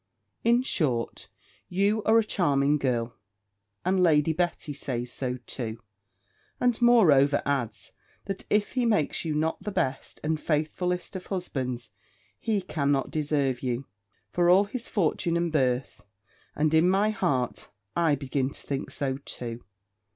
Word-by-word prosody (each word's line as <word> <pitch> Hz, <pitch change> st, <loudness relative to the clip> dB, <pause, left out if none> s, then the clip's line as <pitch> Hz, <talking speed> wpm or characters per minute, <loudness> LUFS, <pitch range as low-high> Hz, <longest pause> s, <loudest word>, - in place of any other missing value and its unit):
In 235 Hz, +2 st, +4 dB
short, 130 Hz, -, -1 dB, 0.4 s
you 200 Hz, +4 st, +2 dB
are 220 Hz, +1 st, +5 dB
a 225 Hz, -, +5 dB
charming 145 Hz, -7 st, +2 dB
girl; 120 Hz, -3 st, -1 dB, 0.7 s
and 185 Hz, 0 st, +2 dB
Lady 160 Hz, -2 st, +4 dB
Betty 170 Hz, -3 st, -1 dB
says 125 Hz, -3 st, -4 dB
so 125 Hz, -1 st, -2 dB
too; 115 Hz, -3 st, -5 dB, 0.8 s
and 245 Hz, -1 st, +1 dB
moreover 155 Hz, -, +5 dB
adds, 125 Hz, -6 st, -2 dB, 0.3 s
that 195 Hz, -1 st, -4 dB
if 210 Hz, -1 st, +2 dB
he 255 Hz, -1 st, 0 dB
makes 210 Hz, -9 st, +1 dB
you 155 Hz, -2 st, -1 dB
not 160 Hz, +2 st, 0 dB
the 210 Hz, -, -4 dB
best 135 Hz, -9 st, -2 dB
and 155 Hz, 0 st, 0 dB
faithfullest 175 Hz, +5 st, -1 dB
of 185 Hz, -, -6 dB
husbands, 130 Hz, -, -3 dB, 0.5 s
he 215 Hz, -3 st, 0 dB
cannot 145 Hz, -5 st, 0 dB
deserve 145 Hz, -4 st, 0 dB
you, 125 Hz, +1 st, -2 dB, 0.5 s
for 175 Hz, 0 st, +3 dB
all 190 Hz, +3 st, +7 dB
his 235 Hz, +4 st, -5 dB
fortune 170 Hz, -2 st, +1 dB
and 170 Hz, -1 st, 0 dB
birth. 130 Hz, -3 st, 0 dB, 0.5 s
And 155 Hz, +1 st, +1 dB
in 160 Hz, +3 st, +5 dB
my 200 Hz, +3 st, +3 dB
heart, 135 Hz, -, -1 dB, 0.3 s
I 165 Hz, -4 st, +3 dB
begin 135 Hz, -1 st, -1 dB
to -, -, -11 dB
think 140 Hz, -1 st, -3 dB
so 135 Hz, -2 st, -2 dB
too. 120 Hz, -4 st, -7 dB
155 Hz, 145 wpm, -27 LUFS, 135-185 Hz, 0.8 s, all